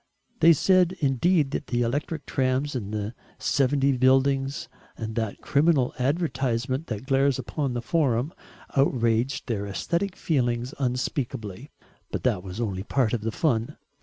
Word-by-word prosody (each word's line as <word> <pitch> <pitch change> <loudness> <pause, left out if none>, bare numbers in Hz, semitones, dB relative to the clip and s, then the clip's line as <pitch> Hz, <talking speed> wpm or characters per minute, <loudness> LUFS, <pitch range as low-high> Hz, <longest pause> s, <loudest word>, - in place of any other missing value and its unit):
They 165 - +7
said 185 +3 +3
indeed 145 +1 +2
that 145 - -3
the 120 -1 +1
electric 145 +5 -2
trams 130 +2 0
and 105 -5 -4
the 105 +1 -3 0.2
'70 135 0 +2
buildings, 135 +2 +2 0.3
and 110 -1 -4
that 110 -2 -3
criminal 145 -3 +2
advertisement 135 -2 0
that 110 +1 -5
glares 135 -1 +2
upon 130 +2 -3
the 120 - -3
Forum, 140 -2 +1 0.4
outraged 125 -2 +1
their 100 -4 -2
aesthetic 170 - -2
feelings 125 -4 0
unspeakably; 125 - -3 0.4
but - - -4
that 90 - +1
was 95 +2 -7
only 100 -5 -2
part 120 +2 0
of 120 - 0
the 110 +1 -2
fun. 115 -5 0
130 Hz, 140 wpm, -26 LUFS, 115-145 Hz, 0.4 s, They